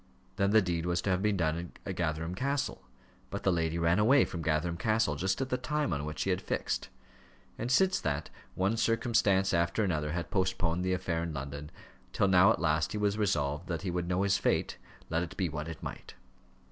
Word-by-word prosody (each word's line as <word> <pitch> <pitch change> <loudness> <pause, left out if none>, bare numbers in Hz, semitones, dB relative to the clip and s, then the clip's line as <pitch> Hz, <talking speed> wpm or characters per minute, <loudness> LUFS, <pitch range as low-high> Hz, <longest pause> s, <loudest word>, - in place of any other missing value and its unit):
Then 100 0 +2
the 110 0 +5
deed 85 -2 -1
was 85 -1 +1
to 95 - 0
have 90 0 +1
been 105 -1 +1
done 85 +1 -1
at 95 - -4
Gatherum 80 0 -2
Castle, 140 +7 -2 0.5
but - - -5
the 95 - +3
lady 85 -1 0
ran 85 +3 +2
away 125 +5 +5
from 85 -3 -6
Gatherum 80 +2 0
Castle 110 -5 +1
just 95 - -1
at 135 - -2
the 125 - -1
time 150 +2 -1
on 70 0 -2
which 75 0 -3
he 95 - 0
had 90 - 0
fixed. - - -2 0.7
And 120 +2 -2
since 190 +7 +4
that, 75 -1 -2 0.2
one 100 +5 +1
circumstance 110 -4 +2
after 85 +5 +1
another 75 -6 -1
had 85 0 -4
postponed 95 -3 0
the 95 0 +1
affair 90 -3 -1
in 85 -2 -4
London, 70 +2 -6 0.4
till 100 - +2
now 95 +2 +6
at - - 0
last 80 0 +1
he - - -2
was 105 0 0
resolved 75 -5 0
that 85 0 -3
he 95 - -2
would 85 0 -2
know 90 +2 +1
his 100 0 +2
fate, - - 0 0.3
let 80 - +1
it 85 -2 -6
be 90 -3 0
what 75 0 -5
it 80 - -8
might. - - -7
90 Hz, 215 wpm, -31 LUFS, 80-100 Hz, 0.7 s, now